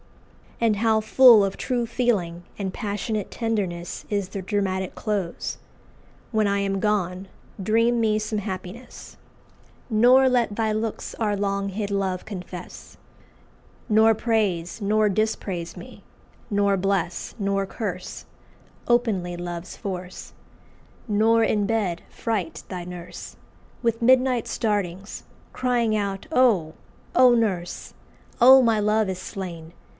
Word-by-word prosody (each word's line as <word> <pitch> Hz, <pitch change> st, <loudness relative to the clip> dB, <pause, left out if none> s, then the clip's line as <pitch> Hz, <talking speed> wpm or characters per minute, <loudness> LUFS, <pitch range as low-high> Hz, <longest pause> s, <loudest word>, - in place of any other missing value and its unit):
And 225 Hz, -3 st, +2 dB
how 220 Hz, 0 st, +3 dB
full 230 Hz, -1 st, +7 dB
of 195 Hz, -1 st, -2 dB
true 245 Hz, -2 st, -1 dB
feeling 185 Hz, -9 st, -1 dB
and 190 Hz, -2 st, -3 dB
passionate 210 Hz, -1 st, -3 dB
tenderness 195 Hz, -7 st, -3 dB
is 200 Hz, -3 st, -1 dB
the 195 Hz, -1 st, -5 dB
dramatic 190 Hz, -2 st, -1 dB
close! 200 Hz, -6 st, -3 dB, 0.7 s
"When 215 Hz, -2 st, +2 dB
I 200 Hz, 0 st, +1 dB
am 195 Hz, -1 st, -1 dB
gone 190 Hz, -2 st, -1 dB, 0.3 s
dream 230 Hz, +4 st, +2 dB
me 215 Hz, -2 st, +2 dB
some 215 Hz, 0 st, -2 dB
happiness, 190 Hz, +4 st, -8 dB, 0.7 s
Nor 250 Hz, +4 st, +6 dB
let 240 Hz, -4 st, +1 dB
thy 220 Hz, -1 st, 0 dB
looks 220 Hz, +1 st, -3 dB
our 210 Hz, -2 st, 0 dB
long 200 Hz, 0 st, -1 dB
hid 200 Hz, +1 st, -3 dB
love 190 Hz, -2 st, -1 dB
confess; 180 Hz, -3 st, -9 dB, 0.9 s
Nor 220 Hz, +1 st, +5 dB
praise 210 Hz, -5 st, -1 dB
nor 215 Hz, +1 st, +2 dB
dispraise 195 Hz, -4 st, -2 dB
me; -, -, -11 dB, 0.5 s
nor 200 Hz, -1 st, +2 dB
bless 185 Hz, -2 st, -1 dB
nor 195 Hz, -1 st, 0 dB
curse 190 Hz, -4 st, -5 dB, 0.6 s
Openly 210 Hz, -8 st, +1 dB
love's 175 Hz, 0 st, -6 dB
force; 185 Hz, -2 st, -7 dB, 0.7 s
nor 225 Hz, +2 st, +3 dB
in 210 Hz, -2 st, +1 dB
bed 205 Hz, -6 st, -1 dB
fright 205 Hz, -8 st, -3 dB
thy 180 Hz, -2 st, -5 dB
nurse 175 Hz, -1 st, -9 dB, 0.5 s
With 230 Hz, -1 st, 0 dB
midnight 255 Hz, 0 st, +3 dB
startings, 200 Hz, -3 st, -2 dB, 0.3 s
crying 240 Hz, -3 st, +1 dB
out, 200 Hz, +1 st, -3 dB
'Oh! 210 Hz, -, +3 dB, 0.4 s
oh! 250 Hz, -1 st, +7 dB
Nurse! 190 Hz, -7 st, -2 dB, 0.5 s
oh, 260 Hz, +2 st, +9 dB
my 225 Hz, -3 st, +3 dB
love 210 Hz, 0 st, +2 dB
is 185 Hz, -1 st, -4 dB
slain! 170 Hz, -4 st, -7 dB
205 Hz, 120 wpm, -24 LUFS, 185-225 Hz, 0.9 s, oh